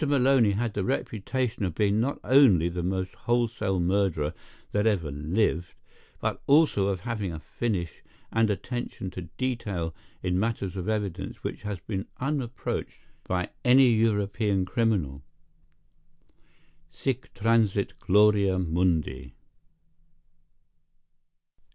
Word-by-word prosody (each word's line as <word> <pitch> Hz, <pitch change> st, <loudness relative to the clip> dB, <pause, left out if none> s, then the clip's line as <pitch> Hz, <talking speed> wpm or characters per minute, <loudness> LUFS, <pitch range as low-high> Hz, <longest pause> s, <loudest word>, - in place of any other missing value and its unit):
Maloney 130 Hz, -6 st, +4 dB
had 115 Hz, +1 st, -1 dB
the 100 Hz, -, -1 dB
reputation 110 Hz, +4 st, -2 dB
of 90 Hz, -4 st, -2 dB
being 105 Hz, +1 st, +2 dB
not 135 Hz, +5 st, -1 dB
only 120 Hz, -, +5 dB
the 90 Hz, +1 st, -3 dB
most 95 Hz, +1 st, -2 dB
wholesale 115 Hz, -5 st, 0 dB
murderer 85 Hz, -4 st, +1 dB, 0.4 s
that 105 Hz, +2 st, +2 dB
ever 90 Hz, -9 st, +1 dB
lived, 85 Hz, +4 st, -1 dB, 0.4 s
but -, -, -2 dB
also 140 Hz, -9 st, +4 dB
of 95 Hz, -3 st, -1 dB
having 105 Hz, -4 st, -3 dB
a 80 Hz, -, -5 dB
finish 90 Hz, +1 st, -3 dB, 0.3 s
and 115 Hz, -1 st, +2 dB
attention 105 Hz, -2 st, -4 dB
to 90 Hz, -3 st, -8 dB
detail 105 Hz, -10 st, -2 dB, 0.3 s
in 90 Hz, 0 st, +1 dB
matters 100 Hz, -4 st, -2 dB
of 95 Hz, +2 st, -3 dB
evidence 100 Hz, -4 st, -3 dB
which -, -, -4 dB
has 105 Hz, -2 st, -4 dB
been 95 Hz, -1 st, -4 dB
unapproached 135 Hz, -3 st, -3 dB, 0.3 s
by 90 Hz, -1 st, 0 dB, 0.2 s
any 130 Hz, +1 st, +6 dB
European 105 Hz, -3 st, +1 dB
criminal. 90 Hz, -, 0 dB, 1.7 s
Sic 130 Hz, -1 st, -3 dB
transit 105 Hz, -2 st, +2 dB
gloria 100 Hz, -1 st, +4 dB
mundi!" 80 Hz, -7 st, 0 dB
100 Hz, 115 wpm, -27 LUFS, 90-115 Hz, 1.7 s, any